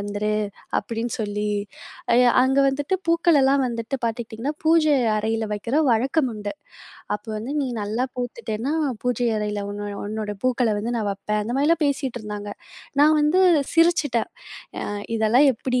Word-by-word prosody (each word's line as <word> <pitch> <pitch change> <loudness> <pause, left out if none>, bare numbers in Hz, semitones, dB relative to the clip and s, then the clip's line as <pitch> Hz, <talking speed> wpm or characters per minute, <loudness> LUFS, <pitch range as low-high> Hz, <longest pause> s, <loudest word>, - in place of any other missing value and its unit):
வந்துரு", 205 +1 -2 0.5
அப்படின்னு 230 0 -4
சொல்லி. 210 0 -2 0.6
அய, 245 - +6 0.2
அங்க 265 +1 +2
வந்துட்டு 280 +6 -1
பூக்கள் 335 -2 +4
எல்லாம் 270 +1 +3
வந்துட்டு 235 +2 -3
பார்த்துக்கிட்டிங்கன்னா, 230 +3 -3
பூஜை 315 -2 +4 0.2
அறையில 220 +1 -1
வைக்கிற 230 +8 -1
வழக்கம் 260 +4 +1
உண்டு. 205 -1 -5 0.6
அப்போ 210 +2 -8
வந்து, 225 +6 -5
"நீ 275 - -1
நல்லா 215 +4 -1
பூத்துட்டேன்னா, 240 +1 -3 0.3
பூஜை 245 -1 0
அறையில 210 -1 -2
உன்னோ 205 0 -5 0.2
உன்னோட 210 0 -4
பூக்கள 250 -2 +2
வந்து 225 +3 -3
நான் 215 -3 -1
வப்பேன்". 210 +2 -2
அந்த 230 - -3
மாரிலாம் 320 +4 +2
பேசிட்டிருந்தாங்க. 220 -7 -3 0.5
நான் 305 +2 +6
வந்து, 300 +5 +3 0.3
சிரிச்சுட்டேன். 330 -8 +3 0.5
"அ - - -3 0.3
இதெல்லாம் 225 +6 +4
எப்படி?" 250 +2 -1
235 Hz, 140 wpm, -23 LUFS, 215-275 Hz, 0.6 s, அய